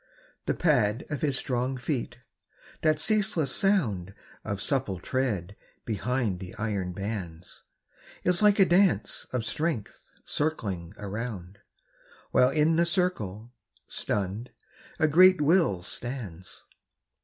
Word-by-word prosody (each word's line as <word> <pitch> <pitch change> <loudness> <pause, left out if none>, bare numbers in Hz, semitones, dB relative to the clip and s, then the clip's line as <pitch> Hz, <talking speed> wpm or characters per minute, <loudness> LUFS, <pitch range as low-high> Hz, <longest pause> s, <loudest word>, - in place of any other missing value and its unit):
The - - +1
pad 125 -6 +2
of 145 - -3
his 140 -4 +1
strong 130 +1 -1
feet, 125 -2 -3 0.6
that 155 -1 +3
ceaseless 210 - +1
sound 110 - +1 0.3
Of 100 -2 -3
supple 100 -3 -1
tread 100 -5 -2 0.3
behind 115 -2 -1
the 90 -1 -8
iron 100 -4 -2
bands, 90 -3 -6 0.6
Is 180 +1 +2
like 210 -1 +5
a 195 - +7
dance 175 - +2
of 125 -3 -2
strength 155 -8 -3 0.2
circling 100 - -2
around, 100 -2 -6 0.7
While 125 - +5
in 155 +3 +3
the 170 - +4
circle, 120 - -1 0.3
stunned, 105 +4 -2 0.5
a 155 - +3
great 185 +3 +7
will 150 - +3
stands. 100 -7 -7
125 Hz, 115 wpm, -28 LUFS, 100-155 Hz, 0.7 s, a